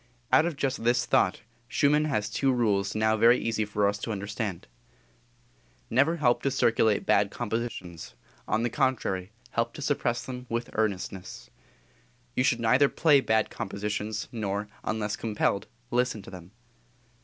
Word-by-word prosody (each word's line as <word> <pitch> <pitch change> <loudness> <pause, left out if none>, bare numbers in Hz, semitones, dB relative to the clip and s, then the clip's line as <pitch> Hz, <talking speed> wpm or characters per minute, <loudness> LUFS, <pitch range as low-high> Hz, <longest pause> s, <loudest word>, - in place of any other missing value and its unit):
Out 160 - +6
of 170 - -3
just 135 -4 -2
this 120 +1 +2
thought - - +2 0.3
Schumann 150 +3 +3
has 105 -9 0
two 135 +6 +1
rules 105 -6 +1
now 110 0 +2
very 115 +3 +5
easy 115 -2 -1
for 105 0 +1
us 100 0 -1
to 115 - -4
understand: 100 -2 -4 1.3
"Never 140 +8 +3
help 120 -5 +2
to 140 - +1
circulate 115 -5 +2
bad - - +3
compositions; 105 -7 -5 0.3
on 110 +1 +1
the 120 - 0
contrary, 120 -9 0 0.2
help 115 0 -1
to - - -7
suppress 120 -4 0
them 125 -1 -7
with 120 +1 -3
earnestness." 95 - -3 0.8
"You 125 - +2
should 120 -3 +2
neither 125 +5 +4
play 150 -4 +4
bad 110 -3 +1
compositions, 105 +2 -3
nor, 105 -2 -3
unless 105 -1 -2
compelled, 105 -3 -1 0.2
listen 125 -4 0
to - - -11
them." 90 -2 -10
115 Hz, 150 wpm, -27 LUFS, 105-125 Hz, 1.3 s, Out